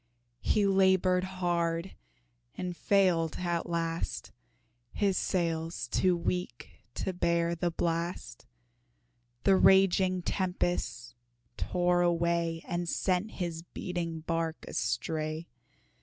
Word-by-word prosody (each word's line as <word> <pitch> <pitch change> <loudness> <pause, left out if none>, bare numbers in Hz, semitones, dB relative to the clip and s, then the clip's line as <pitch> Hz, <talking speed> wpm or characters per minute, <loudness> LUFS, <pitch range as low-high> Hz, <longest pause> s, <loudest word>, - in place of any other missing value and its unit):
He 210 -2 +2
labored 190 -1 +4
hard 175 -1 -1 0.6
and 180 -1 -4
failed 180 -5 +2
at 175 -2 -2
last, 165 -1 -2 0.6
His 200 -2 +1
sails 165 -3 -1
too 180 -2 +2
weak 170 -7 -3 0.2
to 190 - -2
bear 170 -1 +1
the 170 +1 0
blast, 170 -5 -3 1.0
The 195 - +5
raging 190 -1 +4
tempests 175 -11 -2 0.4
tore 180 0 +1
away 170 -1 +1
And 175 0 -2
sent 185 +5 0
his 170 -3 -3
beating 170 -1 -4
bark 165 0 -2
astray. 155 0 -2
175 Hz, 95 wpm, -30 LUFS, 165-185 Hz, 1.0 s, The